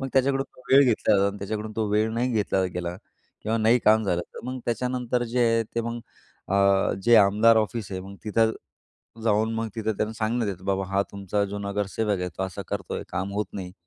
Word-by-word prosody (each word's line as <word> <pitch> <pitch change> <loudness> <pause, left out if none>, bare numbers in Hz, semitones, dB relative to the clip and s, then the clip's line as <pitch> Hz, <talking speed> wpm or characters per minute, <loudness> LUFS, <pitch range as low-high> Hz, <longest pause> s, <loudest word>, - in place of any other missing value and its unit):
मग 135 - -3
त्याच्याकडून 135 +1 +2 0.3
वेळ 140 +1 +8
घेतला 115 -4 +3
जातो 100 0 +3
आणि 100 - -9
त्याच्याकडून 105 +2 -4
तो 110 -1 0
वेळ 110 +2 +2
नाही 120 +2 0
घेतला 100 -3 +1
गेला 90 0 -3 0.5
किंवा 110 +2 0
नाही 115 +3 +4
काम 110 +1 +5
झालं, 90 -3 0
तर - - -7
मग 130 0 -4
त्याच्यानंतर 125 +1 -1
जे 120 +2 -3
आहे 115 0 +3
ते 115 - +1
मग 115 +1 -4 0.5
अ, 100 0 +3
जे 120 +2 +6
आमदार 110 +2 +5
ऑफिस 110 -1 -1
आहे 95 - -3
मग 100 +1 -10
तिथं 110 +1 +2 0.7
जाऊन 110 0 +2
मग 115 0 -2
तिथं 110 -1 -1
त्यांना 110 +1 -1
सांगण्यात 110 0 -1
येतं, 95 -3 -4
की - - -15
बाबा 95 0 0
हा 100 +1 +2
तुमचा 100 +1 -1
जो 100 +1 -5
नगरसेवक 100 0 -1
आहे 90 - -2
तो - - -2
असं 95 - -6
करतोय, - - -4
काम 95 +2 -3
होत 105 +1 -1
नाही. 90 -3 -6
110 Hz, 210 wpm, -25 LUFS, 100-115 Hz, 0.7 s, वेळ